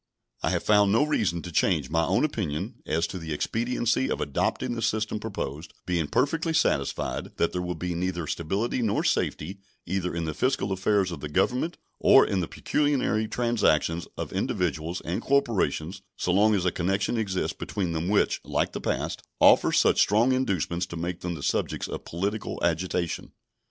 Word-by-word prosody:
I - - +1
have - - 0
found 105 -1 +4
no 115 +7 +4
reason 105 - 0
to 90 - -7
change 80 - +1
my 80 0 +2
own 95 - +2
opinion 95 - -3
as 80 +2 +1
to 95 - -5
the 80 -2 -6
expediency 120 - 0
of - - -1
adopting 120 - -1
the 115 - -4
system 110 -1 0
proposed, 80 -8 -5
being 85 -4 0
perfectly 160 - +1
satisfied 70 - 0
that 85 - +1
there 90 - -2
will 90 0 -3
be 90 -1 -3
neither 85 -1 -2
stability 100 +11 -1
nor 110 -3 +1
safety 95 +6 -1 0.3
either 90 0 -2
in 85 -1 -2
the 80 - -2
fiscal 100 - 0
affairs 95 0 +1
of 85 - -5
the 75 - -6
Government 125 - 0 0.2
or - - +7
in 100 - 0
the 85 - -1
pecuniary 135 -7 0
transactions 105 -9 +1
of - - -5
individuals 80 +3 -1
and 85 - -3
corporations 100 - 0 0.2
so 90 - 0
long 105 +3 +4
as 95 -2 0
a 90 - +3
connection 95 +6 0
exists 100 -5 -1
between 90 -4 -3
them 80 +1 -2
which, 105 - +2
like - - 0
the - - -5
past, - - -2 0.2
offers - - +6
such - - +4
strong 110 +5 +4
inducements 95 - 0
to 85 - -7
make 85 +1 -3
them 90 -1 -3
the 70 - -8
subjects - - -1
of - - -6
political 100 +6 -3
agitation. 85 0 -1
95 Hz, 180 wpm, -26 LUFS, 85-110 Hz, 0.3 s, or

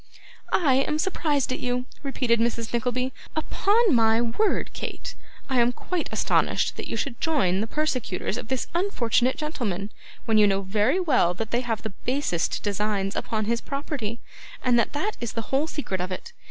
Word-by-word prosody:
'I 280 -8 +4
am 300 - 0
surprised 300 -6 0
at - - -3
you,' 250 0 -1 0.2
repeated 250 -4 +1
Mrs. 230 -1 -1
Nickleby; 250 +2 0 0.2
'upon 405 +6 +3
my 225 -1 +4
word, 240 - +1
Kate, - - -5 0.3
I 260 -2 +2
am 240 +1 +4
quite 345 +7 -3
astonished - - +2
that - - -5
you - - -3
should 235 - -3
join 205 - +2
the 220 - -1
persecutors 255 -10 -1
of 245 -1 -5
this 260 0 -1
unfortunate 260 - +2
gentleman, 220 - -3 0.3
when 220 -2 +4
you 210 - +7
know 195 0 +1
very 210 - +2
well 255 - +3
that 220 +3 -4
they 240 - +2
have 230 -4 -2
the 220 - -3
basest 250 - 0
designs 205 -1 -1
upon 215 -1 -1
his 230 +2 0
property, 275 -6 -3 0.5
and 245 -2 +4
that 235 - +1
that 385 +9 -1
is 235 -3 -3
the 230 +2 -5
whole 285 +4 +3
secret 195 - -3
of 180 +1 -3
it. 330 - -6
240 Hz, 180 wpm, -26 LUFS, 215-290 Hz, 0.5 s, you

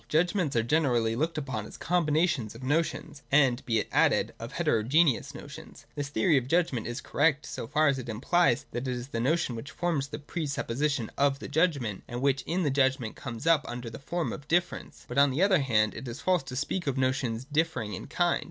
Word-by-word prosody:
Judgments 175 -1 +1
are 115 - +3
generally 120 -5 +2
looked 160 +6 -1
upon 130 -8 -3
as - - -11
combinations 155 - +1
of 120 - -10
notions, 150 +1 -1
and, 135 -3 +4
be 115 -2 +2
it - - -1
added, - - +3
of - - -7
heterogeneous 130 +5 +2
notioris. - - -11
This 145 -1 -4
theory 160 +1 +3
of 125 -2 -1
judgment 150 -8 +1
is 120 +2 -4
correct, 150 0 +1
so - - -6
far 155 +5 +3
as 135 -1 +2
it 120 - -7
implies 135 +4 +2
that 120 +2 -4
it 125 - -1
is 125 +2 -6
the 115 - -3
notion 135 0 +1
which 115 +4 -7
forms 155 0 -1
the 145 - -6
presupposition 145 -4 -2
of 140 -1 +3
the - - -8
judgment, 145 - 0
and 120 - -5
which 140 +1 +1
in 175 +3 0
the 145 - +1
judgment 130 -4 +1
comes 120 +2 -7
up 165 -3 +4
under 120 -1 -6
the 115 - -8
form 170 +4 -2
of 140 -1 -9
difference. 175 +2 -1
But 125 +3 0
on 140 0 +6
the 140 +8 +1
other 195 -3 +4
hand, 110 -6 +2
it 130 - -7
is 120 +2 -6
false 185 -3 +2
to 125 - -7
speak 150 +5 -2
of 135 -1 0
notions 130 -3 0
differing 150 -8 -1
in 95 - -6
kind. 175 -1 +1
140 Hz, 215 wpm, -28 LUFS, 120-160 Hz, -, on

